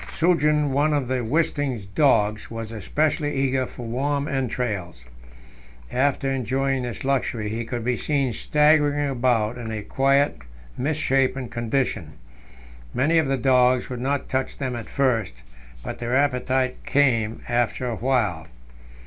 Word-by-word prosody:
Suggen, 150 -3 +2
one 145 +3 +2
of 135 -4 -1
Wisting's 130 -2 0
dogs, 105 -2 +2
was 115 -1 -6
especially 145 - -1
eager 135 -1 +1
for 120 - -9
warm 140 +5 -1
entrails; 110 - -3 0.9
after 135 +1 +1
enjoying 135 +1 0
this 120 -2 -5
luxury, 125 -5 0
he 115 +2 -3
could 120 0 -5
be 125 0 +1
seen 140 -2 0
staggering 150 +1 +3
about 120 -2 +1
in 115 -2 -5
a 110 -1 -4
quite 140 +4 +2 0.4
misshapen 135 -3 0
condition. 120 - -2 0.8
Many 155 +6 +3
of 155 - +1
the 135 0 +1
dogs 125 0 +3
would 125 -1 -4
not 140 +1 -1
touch 130 0 -2
them 130 -3 -3
at 115 -2 -7
first, 125 - +1 0.5
but - - -6
their 120 +1 -1
appetite 130 -2 0
came 115 -6 +1
after 120 +1 0
a 120 - -2
while. 110 -10 0
130 Hz, 135 wpm, -24 LUFS, 120-140 Hz, 0.9 s, staggering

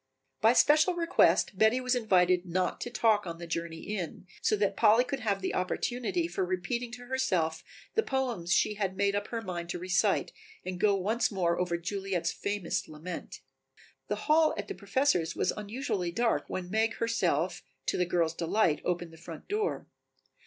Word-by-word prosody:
By 225 +2 +6
special 310 +7 +5
request 335 - +3
Betty 220 +3 +4
was 255 0 0
invited 185 -7 +3
not 180 0 -1
to - - -3
talk 220 -4 +2
on 165 -1 -5
the 170 - -7
journey 165 0 -4
in, 185 -4 -5 0.2
so - - +2
that 205 -1 0
Polly 225 +4 +5
could 265 +2 -4
have 200 -5 -1
the - - -1
opportunity 250 - -1
for 195 - -2
repeating 185 +7 -2
to 245 0 -8
herself 185 -11 0 0.3
the 445 - +3
poems 250 - -2
she 210 - +3
had 195 -2 -2
made 200 0 +2
up 205 +1 -2
her 230 -1 -4
mind 175 -3 -5
to 175 - -2
recite 185 +1 +1 0.3
and 185 -1 -4
go 200 +1 +4
once 215 +6 0
more 175 -4 0
over 175 -1 0
Juliet's 185 -1 -2
famous 200 -4 -2
lament. 160 +3 -7 0.7
The - - -3
hall 310 +1 +4
at - - -4
the - - -4
Professor's 260 - +1
was - - +1
unusually 210 -4 -3
dark 230 +5 +1
when 180 -1 -5
Meg 220 +1 +1
herself, 180 -7 0 0.2
to - - 0
the 180 - +1
girls' 170 -2 +1
delight, 165 0 +1
opened 175 -2 -2
the - - -13
front 165 -1 -10
door. 425 +2 -1
195 Hz, 180 wpm, -30 LUFS, 175-235 Hz, 0.7 s, By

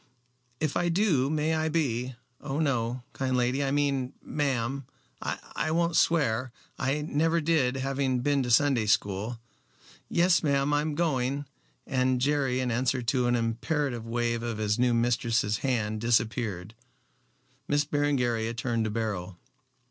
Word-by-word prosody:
"If 155 -2 -1
I 175 0 +1
do 165 -8 +2
may 155 +1 0
I 160 0 0
be 130 -6 -1 0.2
oh 140 -1 -4
no, 125 -4 0
kind 130 -1 -1
lady 125 +3 +1
I 135 - 0
mean, 140 -2 0
ma'am 135 -2 -2 0.3
I - - -3
won't 170 +1 +1
swear. 130 -8 +2 0.3
I 135 +3 0
never 165 +2 +1
did, 150 -5 +2
having 135 -1 0
been 140 +1 +2
to 125 - -2
Sunday 120 -2 +3
school. 105 +3 0 0.7
Yes, 170 0 +3
ma'am, 140 -1 +1
I'm 150 +1 0
going," 140 -3 0 0.4
and 130 -1 +1
Jerry 135 -1 +1
in 125 -1 -1
answer 125 +2 0
to 125 +1 +1
an 120 - +2
imperative 120 +1 -1
wave 120 0 -1
of 115 -2 -3
his 105 +1 0
new 125 -1 +3
mistress's 115 -2 +1
hand 110 -5 -1
disappeared. 110 -4 0 0.9
Miss 145 0 +2
Berengaria 125 -6 0
turned 115 -1 -1
to - - -1
Beryl. 100 -5 -3
130 Hz, 140 wpm, -28 LUFS, 115-145 Hz, 0.9 s, Sunday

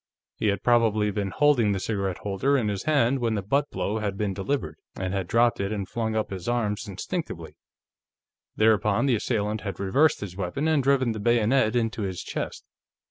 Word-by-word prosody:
He - - -1
had 100 -2 0
probably 110 -3 +3
been 100 -1 -2
holding 120 -4 +3
the 95 - -2
cigarette 100 -3 -2
holder 105 +8 +1
in 110 -5 0
his 100 +4 -3
hand 140 -4 +2
when 115 -2 0
the 100 - -2
butt 140 +8 +1
blow 110 +2 -2
had 100 -2 -3
been 100 -2 -1
delivered, 95 - -3 0.2
and 95 0 -3
had 95 -3 -2
dropped 115 +2 +3
it 100 +1 -1
and 100 -3 -3
flung 110 -2 -2
up 110 -2 -1
his 95 +2 -4
arms 115 -2 -1
instinctively. 95 - -5 1.0
Thereupon, 110 +2 +3
his 120 - +3
assailant 105 -2 -1
had 100 -4 -5
reversed 135 +11 +2
his 95 -3 -6
weapon 100 - -2
and 155 -3 +3
driven 130 -2 +2
the 110 - -4
bayonet 120 +2 +2
into 115 -1 0
his 95 -3 -3
chest. - - -5
110 Hz, 190 wpm, -26 LUFS, 100-120 Hz, 1.0 s, probably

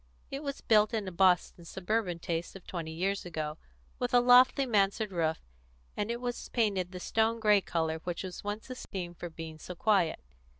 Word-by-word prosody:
It 275 - -4
was 280 -2 -5
built 215 +1 +4
in 210 -3 -2
a - - -3
Boston 180 -1 +2
suburban 190 +1 -2
taste 170 0 -4
of 190 - -11
twenty 165 -3 -5
years 195 +5 -1
ago, 155 -3 -4 0.4
with - - 0
a - - +8
lofty 250 +2 +6
mansard 210 -2 +1
roof, 160 -3 0 0.6
and 205 +1 -2
it 235 0 -2
was 245 -1 -4
painted 200 -6 0
the 180 - -7
stone 225 +4 +1
grey 210 -2 +5
colour 160 -3 -1
which 175 +2 -4
was 185 -2 -7
once 210 +4 -5
esteemed 180 -8 -6
for 175 - -5
being 160 -1 -8
so 180 - -8
quiet. 195 -3 +2
190 Hz, 185 wpm, -30 LUFS, 170-220 Hz, 0.6 s, a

